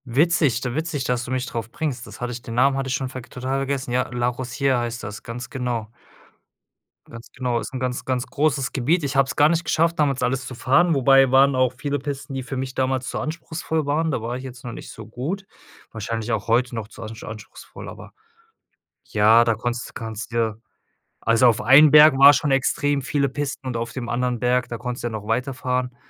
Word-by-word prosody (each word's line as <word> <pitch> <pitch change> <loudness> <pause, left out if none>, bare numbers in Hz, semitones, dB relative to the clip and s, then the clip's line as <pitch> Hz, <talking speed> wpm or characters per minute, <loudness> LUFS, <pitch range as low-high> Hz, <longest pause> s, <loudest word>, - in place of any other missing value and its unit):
Witzig 140 -1 +2
du 125 -2 -3
witzig, 155 -1 -2
dass 125 -1 -1
du 125 - -7
mich 130 0 -1
drauf 115 -3 -5
bringst. 135 -6 -4
Das - - -12
hatte 125 0 -2
ich 120 0 -6
den 115 -1 -7
Namen 135 +3 +4
hatte 135 0 -2
ich 130 - 0
schon 130 -1 -3
verg 130 -2 -9
total 130 +2 -3
vergessen. 135 -2 -3
Ja, 125 +1 0
La 120 0 0
Rosière 130 +1 -1
heißt 120 0 -4
das, 105 +1 -7
ganz 125 +1 -7
genau. 120 -4 -3 1.2
Ganz 115 0 -11
genau, 125 -2 -1
ist - - -7
'n 130 - -4
ganz, 125 -1 -3
ganz 130 0 -1
großes 140 -2 0
Gebiet. 150 +7 +1
Ich 140 0 -2
habe 135 0 +4
es - - -6
gar 145 - +6
nicht 170 +1 0
geschafft, 165 +1 +1
damals 140 -4 +1
alles 130 +1 0
zu 130 - -7
fahren, 140 +9 +3
wobei 135 -1 +5
waren 135 +1 +5
auch 130 -1 +2
viele 145 -1 -2
Pisten, 140 0 -6
die 135 - -3
für 130 +1 -6
mich 130 0 -4
damals 130 -1 -1
zu - - -3
anspruchsvoll 160 -1 -3
waren. 160 +3 +1
Da 130 - -1
war 120 +2 -4
ich 130 - -7
jetzt 125 -2 -10
noch 120 - -5
nicht - - -9
so 110 - -10
gut. 150 - -5 0.5
Wahrscheinlich 110 +1 -4
auch 105 -3 -2
heute 120 +2 +2
noch 110 -2 -5
zu - - -13
ansch 110 0 -8
anspruchsvoll, 110 0 -10
aber - - -11 0.9
ja, 110 +2 +5
da 115 -1 +2
konntest 120 +2 -4
kannst 110 0 -6
dir 115 -2 -1 0.6
also, 115 +2 +4
auf 115 - +2
einen 140 +6 +7
Berg 150 -2 +8
war 140 +1 +9
schon 145 +1 0
extrem 140 +1 +1
viele 140 +1 0
Pisten 140 -1 -4
und 125 -2 -2
auf 115 0 -4
dem 120 -2 -5
anderen 125 0 -1
Berg, 125 +1 +1
da 120 - -4
konntest 125 +1 -5
du - - 0
ja - - -5
noch 105 -1 -6
weiterfahren. 125 +1 -1
130 Hz, 225 wpm, -23 LUFS, 120-140 Hz, 1.2 s, war